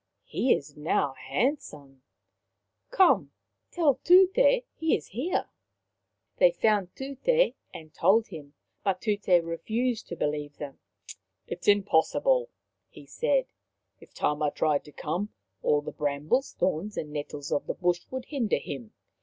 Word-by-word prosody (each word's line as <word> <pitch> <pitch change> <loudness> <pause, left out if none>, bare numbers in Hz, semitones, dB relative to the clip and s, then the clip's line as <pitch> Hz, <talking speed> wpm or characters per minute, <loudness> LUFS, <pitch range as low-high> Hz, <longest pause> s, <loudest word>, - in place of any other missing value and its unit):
" - - -55
He 260 - 0
is 140 - -8
now 150 -2 0
handsome. 145 - -3 0.9
Come, 385 -7 +3 0.4
tell 295 -7 +2
Tute 370 +2 +6 0.4
he 320 0 +1
is 150 - -14
here." 260 - -2 0.9
They - - +6
found 210 - +1
Tut6 465 - +1 0.2
and 155 -1 -11
told 220 +3 +3
him, 150 -5 -10 0.3
but 190 -2 0
Tut6 200 -5 +2
refused 225 +8 -2
to 170 - -6
believe 150 -2 -3
them. 140 -2 -8 0.3
" 95 -1 -41
It - - -6
is - - -10
impossible," 205 - +3 0.4
he - - -14
said. - - +1 0.3
" - - -52
If - - -16
Tama 150 0 0
tried 150 -1 0
to 150 - -13
come, 175 +9 -4 0.3
all 145 0 +2
the - - -6
brambles, 150 - -1
thorns 185 +4 -1
and 150 -1 -4
nettles 145 -1 -5
of - - -1
the - - -2
bush 175 -1 0
would 260 -1 -5
hinder 260 -8 0
him. 135 -5 -7
185 Hz, 145 wpm, -28 LUFS, -, 0.9 s, Tute